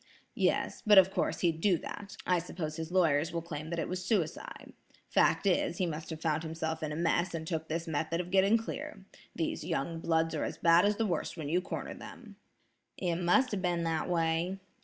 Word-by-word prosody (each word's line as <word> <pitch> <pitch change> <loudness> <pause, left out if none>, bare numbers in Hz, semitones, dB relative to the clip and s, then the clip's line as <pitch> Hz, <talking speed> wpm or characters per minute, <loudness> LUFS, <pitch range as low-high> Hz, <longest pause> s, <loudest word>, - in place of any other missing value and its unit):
"Yes; - - 0
but 210 -3 +6
of 190 0 +8
course, - - -1
he'd 165 -2 +1
do 190 -3 +4
that. 200 +4 -8
I 180 -1 +3
suppose 165 -2 -5
his 165 +1 -5
lawyers 165 -3 +3
will 170 0 -3
claim 155 -2 -6
that 170 - -3
it 165 - -1
was 185 0 -4
suicide. 180 -5 -2 0.4
Fact - - +3
is, 180 -2 +2
he 185 - +1
must 160 -1 -5
have 160 -2 -5
found 160 -1 0
himself 160 0 -3
in 155 -1 -3
a - - -3
mess 170 +1 +1
and 160 -1 -4
took 160 -1 -3
this 165 +2 -3
method 160 +2 -1
of 180 0 -4
getting 195 +3 +5
clear. 210 -3 -6 0.3
These 165 - -2
young 165 +4 -2
bloods 165 0 +1
are 155 - -1
as - - -4
bad 170 +2 +5
as 205 0 +3
the 225 - +1
worst 175 -2 -2
when 150 -3 -4
you 175 +4 +2
corner - - -5
them." - - -11 0.6
"It 175 -3 -1
must 180 +10 +3
have 200 -3 -2
been 175 -2 0
that 165 0 -1
way. 165 +2 0
170 Hz, 215 wpm, -31 LUFS, 160-185 Hz, 0.6 s, of